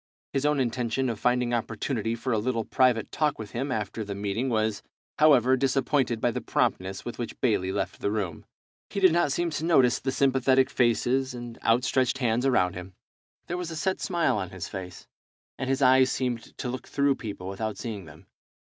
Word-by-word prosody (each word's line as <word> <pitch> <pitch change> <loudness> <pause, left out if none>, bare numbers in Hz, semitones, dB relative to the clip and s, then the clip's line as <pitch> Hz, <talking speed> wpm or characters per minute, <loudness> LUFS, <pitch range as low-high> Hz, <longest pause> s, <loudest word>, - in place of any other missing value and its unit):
His 140 +1 +1
own 150 -1 +2
intention 125 0 0
of 110 - -6
finding 125 0 +1
opportunity 115 0 -2
for 125 +2 -2
a 110 - +2
little 115 0 -1
private 125 -3 +2
talk 150 -1 0
with 110 -2 -8
him 135 +3 -3
after 110 0 -3
the 100 -1 -5
meeting 105 +6 -2
was, 110 -2 0 0.4
however, 130 -4 +6
disappointed 130 -2 +1
by 120 - +1
the - - -4
promptness 95 +1 -1
with 120 - -6
which 120 - -5
Bayley 100 -6 +1
left 95 -1 -3
the - - 0
room. 100 -7 -3 0.5
He - - -3
did 185 -3 +6
not 170 -4 +2
seem 170 +4 0
to 150 - -3
notice 135 -8 +4
the 135 - -2
sympathetic 130 -1 +3
faces 125 +2 +1
and 120 -1 -8
out 115 +2 +3
stretched 130 +1 +1
hands 120 0 +1
around 90 -9 +2
him. 90 +1 -9 0.5
There 175 - -3
was 180 -2 -4
a 165 - -6
set 190 +5 -1
smile 170 - +1
on 95 -3 -3
his 95 -2 -6
face, 90 -3 -8 0.5
and 135 - -2
his 135 +1 +1
eyes 130 0 +6
seemed 125 -3 -3
to - - -4
look 125 +1 -5
through 140 0 +2
people 100 -4 -6
without 105 +3 -4
seeing 105 -6 -5
them. - - -15
120 Hz, 200 wpm, -27 LUFS, 110-135 Hz, 0.5 s, however